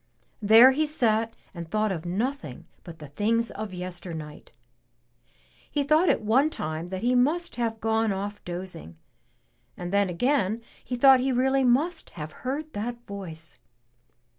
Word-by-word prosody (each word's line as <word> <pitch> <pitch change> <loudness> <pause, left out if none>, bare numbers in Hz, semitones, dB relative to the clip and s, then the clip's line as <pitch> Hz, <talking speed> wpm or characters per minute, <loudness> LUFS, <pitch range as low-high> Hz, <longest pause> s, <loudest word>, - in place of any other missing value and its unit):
There 225 +5 +8
he 305 +3 0
sat 230 -6 +1 0.2
and 170 -2 -8
thought 215 +2 0
of 175 -2 -4
nothing 185 - -3 0.2
but 170 -2 -10
the 150 -3 -11
things 230 +9 0
of 215 -1 -6
yesternight. 175 -4 -7 1.2
He 290 - 0
thought 310 +5 +3
at - - +1
one 255 +8 +3
time 160 - -4
that 190 +2 -5
he 245 +1 +2
must 305 +8 +1
have 225 -2 -2
gone 225 0 +1
off 205 +1 -4
dozing 175 - -7 0.8
and 175 +1 -5
then 200 -1 +3
again 230 +2 0 0.2
he 250 - -4
thought 265 +1 +7
he 265 +1 0
really 265 +2 +2
must 300 +7 +1
have 155 -1 -6
heard 290 - -5
that 235 +3 -5
voice. 165 -6 -9
220 Hz, 150 wpm, -26 LUFS, 180-255 Hz, 1.2 s, There